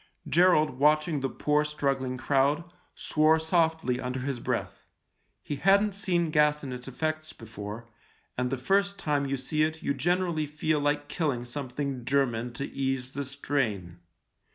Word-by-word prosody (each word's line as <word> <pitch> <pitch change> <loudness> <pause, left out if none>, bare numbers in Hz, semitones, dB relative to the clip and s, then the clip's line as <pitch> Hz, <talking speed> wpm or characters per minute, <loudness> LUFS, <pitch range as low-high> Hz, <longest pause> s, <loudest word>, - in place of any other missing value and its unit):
Gerald, 155 -5 +4
watching 155 +1 +3
the 135 0 -1
poor, 150 +2 +1
struggling 135 -4 -1
crowd, 140 +4 +2 0.3
swore 155 +1 +3
softly 160 -5 +1
under 125 +1 -3
his 135 -1 -3
breath. - - -3 0.6
He 145 - -4
hadn't 200 +5 +4
seen 175 -5 0
gas 150 -1 +3
and 130 -2 -5
its 125 +1 -8
effects 155 +4 -3
before, 110 0 -8 0.5
and 125 0 -1
the 135 - -1
first 200 +9 +1
time 145 -6 0
you 135 0 -1
see 150 +4 -1
it 160 +1 0
you - - +1
generally 170 +1 0
feel 150 +1 0
like 145 0 0
killing 145 -7 -1
some 130 +2 -5
thing 135 -1 -3
German 125 -3 0
to 140 +4 -4
ease 135 -1 -2
the 140 +1 -3
strain. 115 -11 -2
145 Hz, 155 wpm, -28 LUFS, 130-155 Hz, 0.6 s, Gerald